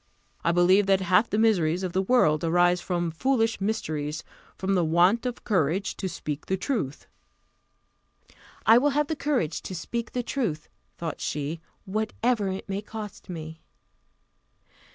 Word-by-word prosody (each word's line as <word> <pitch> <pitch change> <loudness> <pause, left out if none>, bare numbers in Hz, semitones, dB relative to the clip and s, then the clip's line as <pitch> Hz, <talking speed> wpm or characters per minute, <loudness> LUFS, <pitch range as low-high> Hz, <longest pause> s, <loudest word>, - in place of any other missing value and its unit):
"I 170 - +3
believe 185 +3 +4
that 195 -1 +4
half 185 +5 +3
the 210 - 0
miseries 185 -6 +2
of 180 -2 -3
the 190 - +2
world 185 -8 +3
arise 175 +1 +3
from 175 -2 -1
foolish 225 +3 +1
mysteries 155 -8 -2 0.3
from 195 +1 -1
the 180 -2 +3
want 175 +9 +3
of 245 - -5
courage 185 -1 0
to 190 - -3
speak 150 -3 -5
the 190 - 0
truth." 190 - -3 1.6
I 225 +2 +8
will 290 +3 +3
have 295 - +3
the 315 - 0
courage 280 - -1
to 185 - -6
speak 235 +7 -4
the 245 - -1
truth, 210 - -2 0.3
thought 165 -3 -5
she, 150 +3 -3 0.2
whatever 215 +2 0
it 190 0 -4
may 195 0 -3
cost 210 -2 -8
me. 160 -2 -7
190 Hz, 155 wpm, -26 LUFS, 165-220 Hz, 1.6 s, I